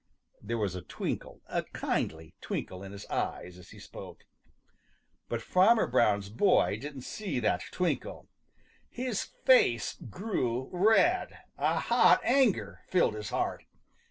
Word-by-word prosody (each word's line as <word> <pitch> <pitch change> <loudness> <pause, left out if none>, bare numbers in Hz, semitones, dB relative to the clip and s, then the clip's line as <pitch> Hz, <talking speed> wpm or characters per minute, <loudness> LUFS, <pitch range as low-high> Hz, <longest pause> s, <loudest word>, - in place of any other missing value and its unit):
There 115 +3 -3
was 100 -5 -1
a 90 - -5
twinkle, 90 - -5
a - - -1
kindly 80 0 -3
twinkle 90 0 -5
in 100 0 -8
his 100 0 -9
eyes 90 0 -4
as 90 - -15
he - - -13
spoke. - - -11 1.1
But - - -3
Farmer 215 +5 +4
Brown's 105 -5 +2
boy 120 - +2
didn't 140 -2 -7
see 185 -8 -4
that 110 - +1
twinkle. 180 -2 -2 0.6
His 250 -4 -3 0.2
face 125 - +4
grew 130 - -2
red. 225 - +3 0.2
A - - +1
hot - - +5
anger 195 - +2
filled 180 -11 +2
his 105 -1 -6
heart. - - -2
125 Hz, 130 wpm, -30 LUFS, -, 1.1 s, hot